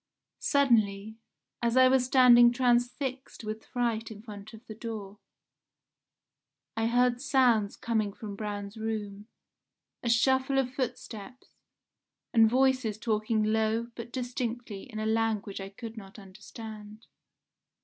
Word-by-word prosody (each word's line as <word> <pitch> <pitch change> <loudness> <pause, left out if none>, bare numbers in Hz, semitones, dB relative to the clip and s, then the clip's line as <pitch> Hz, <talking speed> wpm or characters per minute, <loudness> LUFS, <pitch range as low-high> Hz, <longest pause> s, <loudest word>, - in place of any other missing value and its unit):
"Suddenly, 220 -6 +2 0.4
as 235 +1 +1
I 255 0 +8
was 255 -1 +3
standing 245 -2 +7
transfixed 250 +1 -1
with 215 0 -5
fright 230 -2 -1
in 215 -1 -10
front 210 -2 -10
of 225 +1 -14
the 220 - -8
door, 210 -3 -7 1.6
I 225 0 0
heard 245 +1 +2
sounds 245 -7 +3
coming 220 -3 -1
from 205 0 -8
Braun's 205 0 -5
room, 210 -2 -4 0.7
a 235 - -2
shuffle 265 +3 +3
of 260 -1 0
footsteps, 250 -2 -6 0.8
and 225 -2 +6
voices 255 -3 +2
talking 215 0 0
low 220 +2 0
but 235 0 -8
distinctly 240 -4 -4
in 215 - -7
a 215 - -2
language 220 -3 -1
I 195 - -6
could 225 +3 -9
not 195 -1 -11
understand. 210 +2 -11
225 Hz, 125 wpm, -29 LUFS, 215-245 Hz, 1.6 s, I